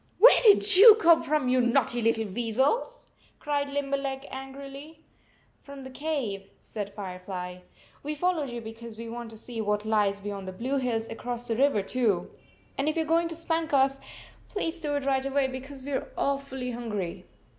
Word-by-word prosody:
" - - -38
Where 475 +6 +8
did 405 -3 +7
you 430 +2 +11
come 335 -6 +5
from, 300 -3 0
you 255 0 +3
naughty 240 0 +1
little 225 0 +1
weasels?" 240 - -1 0.3
cried 285 -1 -2
Limberleg 275 -1 -2
angrily. 275 +4 -9 0.6
"From 280 -1 -11
the 260 - -9
cave," 255 -9 -3
said 205 -2 -6
Firefly. 180 -2 -6 0.4
"We 300 +1 -4
followed 320 -3 0
you 240 -1 -6
because 225 0 -9
we 230 0 -7
want 235 0 -6
to 220 - -12
see 230 0 -6
what 210 0 -1
lies 205 -2 +1
beyond 200 -1 -6
the 185 - -5
blue 255 +8 -2
hills 230 -4 -1
across 240 +1 -5
the 230 - 0
river, 260 -5 +2
too. 220 -3 0 0.5
And 280 +3 +1
if 310 - -2
you 325 - +2
are 320 +1 -1
going 335 0 +3
to 330 - -5
spank 330 -1 -2
us, 270 0 +3 0.5
please 335 -5 -3
do 295 -2 -2
it 285 -1 -2
right 265 -1 +1
away, 275 0 +1
because 265 +1 -8
we 285 - -6
are 265 - -3
awfully 275 -2 -2
hungry." 210 -7 -5
265 Hz, 185 wpm, -27 LUFS, 225-285 Hz, 0.6 s, you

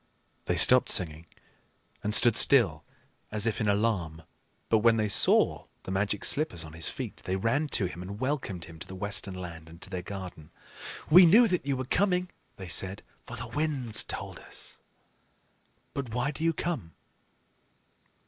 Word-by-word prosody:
They - - -1
stopped - - +6
singing, 80 -1 +2 0.8
and 105 - -1
stood 115 +1 +6
still - - +3 0.5
as 105 0 -1
if 115 -1 -1
in 105 - 0
alarm. 100 -7 -1 0.4
But 110 - +3
when 115 +1 +3
they 110 -1 0
saw 100 - +3 0.2
the - - -7
Magic 100 +1 -2
Slippers 140 - 0
on 80 -1 -11
his 80 0 0
feet, - - -7
they 95 - -2
ran 125 +10 0
to 105 - +2
him, 90 -1 -7
and 100 +3 -8
welcomed 130 - -3
him 80 -1 -13
to - - -8
the 95 - -9
Western 100 0 -2
Land 85 -3 -9
and 85 +1 -14
to 95 - -8
their 90 -2 -4
garden. 90 -5 -9 0.6
"We 180 +2 +9
knew 225 +8 +6
that 180 -6 -2
you 135 -2 0
were 130 - -4
coming," 180 +4 0 0.2
they 95 - -9
said, 95 +4 -1 0.2
"for 120 - -8
the 115 - -6
winds 135 -5 0
told - - -7
us. - - -10 1.2
But 140 -3 -5
why 125 +4 -1
do 155 +2 -7
you 165 0 +2
come?" 150 - -5
105 Hz, 175 wpm, -28 LUFS, 90-135 Hz, 1.2 s, We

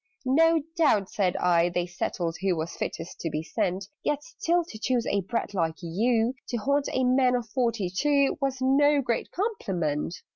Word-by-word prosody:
"No 325 +4 +4
doubt," 220 - +2
said 185 -4 0
I, 175 -1 +3
"they 175 0 -1
settled 175 -1 -3
who 190 -2 +1
Was 160 +1 -4
fittest 165 +2 -5
to 165 - -2
be 155 0 -3
sent: 185 +3 -2 0.2
Yet 295 0 -1
still 350 -6 0
to 220 -9 -10
choose 245 0 0
a 200 - +1
brat 220 +3 -3
like 165 -4 0
you, 225 +7 +1
To 240 - -2
haunt 280 +5 0
a 260 - 0
man 255 0 +3
of 240 -2 -2
forty 230 -5 0
two, 280 +9 +2
Was 270 -1 0
no 285 +3 +4
great 235 -2 -1
compliment!" 180 - -2
230 Hz, 180 wpm, -27 LUFS, 180-275 Hz, 0.2 s, No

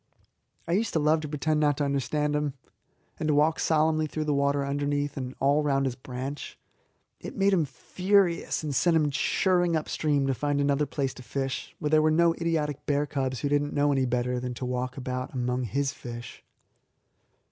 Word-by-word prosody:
I - - -2
used 205 +5 +1
to 160 - +2
love 155 +1 +3
to 155 - -5
pretend 150 +1 0
not 145 -2 +2
to 150 - 0
understand 145 +2 0
him, 150 -2 -1 0.6
and 155 - -1
to 150 - +3
walk 155 +2 +3
solemnly 155 0 +2
through 155 +1 -3
the 150 -1 0
water 140 0 +1
underneath 145 +1 -1
and 130 -1 -5
all 140 +2 +3
round 135 -2 +1
his 130 - 0
branch. 130 +2 -6 0.6
It - - -8
made 200 0 +3
him 170 -5 +3
furious, 180 +6 +1
and 150 -2 -2
sent 165 +6 +3
him 150 -2 +2
chirring 175 +4 +2
upstream 150 -2 0
to 135 - +1
find 145 +3 -1
another 140 +1 +1
place 135 -1 -2
to - - -11
fish, 135 +1 -4
where 150 - -2
there 155 0 +5
were 155 - +3
no 165 +1 +4
idiotic 160 -4 -1
bear 145 0 +2
cubs 130 -3 -2
who 145 - 0
did 145 0 +3
not 145 0 -4
know 145 0 +2
any 135 -2 +1
better 125 0 0
than 125 0 -4
to 130 - -4
walk 125 +1 -3
about 130 0 -4
among 125 0 -1
his 135 +5 -1
fish. 120 -3 -9
145 Hz, 200 wpm, -27 LUFS, 135-155 Hz, 0.6 s, there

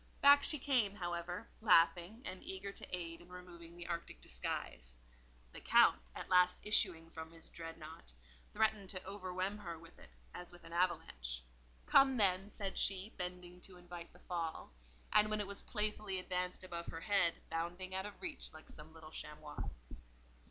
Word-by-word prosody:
Back 285 0 +9
she 300 - +3
came, 250 -8 +2
however, 175 +1 -3
laughing, 185 +2 +5
and 185 - -5
eager 190 +1 -4
to - - -6
aid 165 -1 -6
in 175 - -16
removing 175 -2 -10
the 175 - -6
arctic 170 -1 -4
disguise. - - -4 0.6
The - - -9
Count, 65 - +6
at - - -4
last 180 0 +5
issuing 170 -6 +1
from 160 0 -7
his 165 -1 -12
dreadnought, 165 - -9 0.4
threatened 215 -3 +2
to 185 -1 -2
overwhelm 190 +1 -2
her 170 -5 -5
with 165 0 -15
it - - -13 0.2
as 180 - -7
with 175 -1 -14
an 165 0 -10
avalanche. - - 0 0.4
"Come, 270 -1 +6
then," 195 -1 +5
said 200 -2 -3
she, 195 +2 0
bending 180 0 -6
to 185 -1 -10
invite 175 -1 -9
the - - -17
fall, 165 - -4 0.4
and 210 0 +7
when 215 0 +1
it 205 - +1
was 200 0 -1
playfully 210 -2 -1
advanced 180 0 -1
above 170 -2 -5
her 165 - -5
head, 195 -4 +3
bounding 175 +3 -3
out 190 +2 -1
of 205 - -11
reach 325 -6 -5
like 155 - -12
some 155 +1 -12
little 155 -1 -11
chamois. 150 -1 -6
180 Hz, 170 wpm, -37 LUFS, 165-200 Hz, 0.6 s, Back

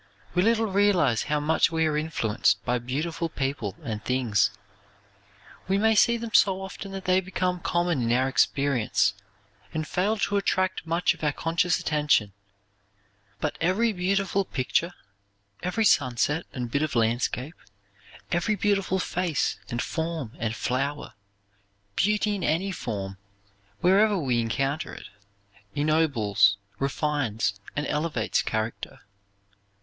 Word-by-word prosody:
We 180 - +3
little 225 +2 +3
realize 190 - +2
how 150 0 0
much 155 +2 +2
we 160 -1 +1
are 155 -1 0
influenced 110 -9 0
by 125 0 +1
beautiful 155 +7 -3
people 135 -1 -3
and 110 -5 -4
things. 120 -6 +2 1.2
We 190 +1 +2
may 220 +2 +4
see 235 +2 +4
them 230 -1 -6
so 190 -1 +4
often 195 +1 -7
that 195 -1 -6
they 185 +1 +3
become 185 -1 -2
common 175 -5 0
in 115 0 0
our 130 +2 +3
experience 135 -6 +2 0.6
and 155 -1 -2
fail 195 +6 0
to 205 0 0
attract 185 -3 0
much 170 +2 +2
of - - -14
our 150 - +2
conscious 165 +3 0
attention, 150 -10 +1 1.1
but - - -3
every 205 +7 +2
beautiful 195 +1 0
picture, 165 +2 -1 0.7
every 185 +5 0
sunset 145 - +2
and 125 -3 -5
bit 140 - +1
of 155 -4 -1
landscape, 120 +5 0 0.8
every 175 +5 +1
beautiful 195 -1 +1
face 180 -4 -1
and 120 0 -2
form 160 -7 -3
and 115 0 -2
flower, 140 +5 -2 0.8
beauty 210 +1 +2
in 195 -3 -3
any 175 +6 0
form, 95 - -5 0.6
wherever 200 +3 +4
we 130 -8 0
encounter 135 +6 -2
it, - - -11 0.7
ennobles, 140 - +3 0.2
refines 135 -8 -1 0.2
and 145 - -1
elevates 150 +2 0
character. 110 +1 -4
155 Hz, 130 wpm, -26 LUFS, 125-185 Hz, 1.2 s, may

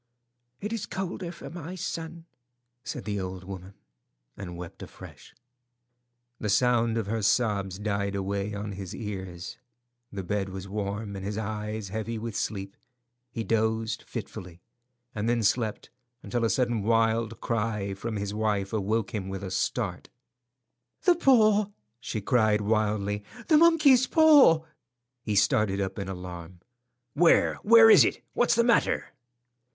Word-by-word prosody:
"It 210 +3 -3
is 215 -3 -4
colder 190 -2 -4
for 175 - -10
my 175 +1 -7
son," 165 -1 -5 0.6
said - - -6
the 105 -2 -2
old 95 0 -5
woman, 95 0 -9 0.6
and 90 -3 -7
wept 85 -1 -9
afresh. - - -12 1.0
The 105 - -3
sound 115 +1 +2
of 115 - -1
her 110 +2 -2
sobs 100 -3 +1
died 100 -1 -2
away 100 +1 -2
on 100 +1 -5
his 95 -2 -7
ears. 95 -5 -6 0.5
The 100 -2 -5
bed 100 +1 -2
was 95 0 -7
warm, 100 +1 -4
and 95 - -6
his 105 +1 -4
eyes 105 -1 -4
heavy 110 +3 -4
with 110 -1 -5
sleep. 100 -2 -3 0.5
He 115 -1 -4
dozed 110 +1 0
fitfully, 90 -2 -8 0.5
and 110 +1 -2
then 120 -1 +1
slept 110 +1 0 0.3
until 120 -1 -2
a - - +1
sudden 120 -3 +1
wild 115 +1 +1
cry 105 -3 -2
from 110 +3 -5
his 100 0 -3
wife 105 -2 -1
awoke 110 +1 -1
him 95 -3 -3
with 95 0 -5
a 95 - -5
start. 95 - -2 0.9
"The 360 - +6
paw!" 215 - +4 0.3
she 110 -2 -4
cried 110 -1 +2
wildly. 105 -1 0 0.3
"The 310 - +7
monkey's 300 -7 +5
paw!" 290 - +6 0.6
He 105 -3 -2
started 100 0 +2
up 95 +1 -3
in 95 -1 -4
alarm. 90 -1 -8 0.5
"Where? 165 +3 +4
Where 225 +1 +8
is - - +9
it? - - -1
What's 240 0 +2
the 235 - +4
matter?" 235 -1 +1
105 Hz, 145 wpm, -27 LUFS, 100-120 Hz, 1.0 s, is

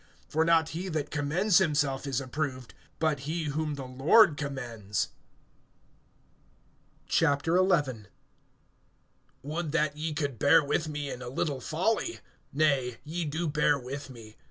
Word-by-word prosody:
(18)For 160 +2 +2
not 165 -1 +3
he 175 +4 -4
that 155 -3 -3
commends 170 +7 +2
himself 145 -6 0
is 135 -2 0
approved, 130 -2 -4 0.2
but 155 -3 +1
he 165 +1 -1
whom 150 0 -2
the 135 -2 -6
Lord 145 - +5
commends. 120 -8 -3 2.0
XI. - - +2 2.2
WOULD 155 +2 -3
that 150 -2 +1
ye 155 +1 -3
could 145 -5 -2
bear 145 - +6
with 155 +2 -1
me 145 -2 -4
in 125 - -7
a 125 - -6
little 135 +1 -2
folly! 220 - -1 0.3
Nay, 135 -5 +1
ye 165 +3 -3
do 160 +3 -2
bear 150 -1 +2
with 135 +2 -7
me. 115 -4 -12
150 Hz, 130 wpm, -29 LUFS, 135-160 Hz, 2.2 s, bear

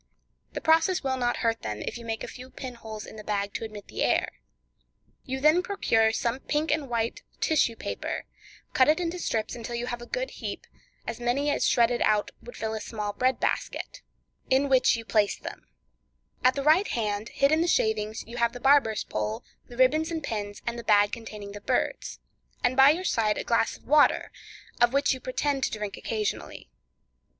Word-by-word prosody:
The - - -4
process 325 +3 +3
will 265 -1 0
not 245 -1 0
hurt 225 0 +1
them, 105 -1 -4
if - - -4
you 235 -1 -8
make 225 -1 -3
a - - -5
few 255 +1 -10
pin 260 -1 -7
holes 220 -3 -8
in - - -11
the 215 - -8
bag 200 -1 -2
to - - -4
admit 215 -2 -8
the - - -6
air; - - +2 1.0
you 265 0 -3
then 305 +5 +5
procure 225 - +2
some 235 +2 -1
pink 300 +3 -1
and 300 -3 -1
white 230 -1 -1 0.2
tissue 290 -7 +2
paper, - - -4 0.5
cut 260 -3 +5
it 310 +2 +4
into 350 0 -2
strips 220 -9 -2
until 235 0 -5
you 235 +1 -2
have 240 -1 -4
a 240 - -9
good - - -3
heap, - - -6 0.4
as 230 - -5
many 275 +5 +1
shredded 240 0 +3
out 210 -1 +2
as - - -19
would 240 - -9
fill 220 0 -3
a 220 - -4
small 210 -2 -4
bread 255 +3 +1
basket, - - -2 0.5
in 270 +2 +3
which 260 -2 +5
you 230 -1 -6
place 210 -2 +2
them; - - -9 0.8
at 255 +1 +5
the 280 - -2
right 320 +7 +5
hand, 210 -1 -2
hid 275 +1 +2
in 315 +1 +3
the 340 - +1
shavings, 220 -6 0
you 235 +2 -9
have 235 -1 +2
the 245 - -7
barber's 270 -5 +4
pole, 105 0 -3 0.2
the 240 - -12
ribbons 305 +5 +3
and 325 -2 -3
pins, 205 -2 -4
and 235 0 -3
the - - -7
bag 205 -2 +4
containing 215 -3 -7
the 205 0 -9
birds, - - -1 0.5
and 245 +1 +2
by 270 +1 +8
your 345 +5 +1
side 215 - +1
a - - -2
glass 230 -1 +1
of - - -27
water, 300 +2 +4 0.5
of 240 +1 +5
which 280 0 +3
you 260 - -6
pretend 270 +2 -1
to - - +2
drink 210 -1 -4
occasionally. 210 - -4
240 Hz, 205 wpm, -27 LUFS, 220-280 Hz, 1.0 s, by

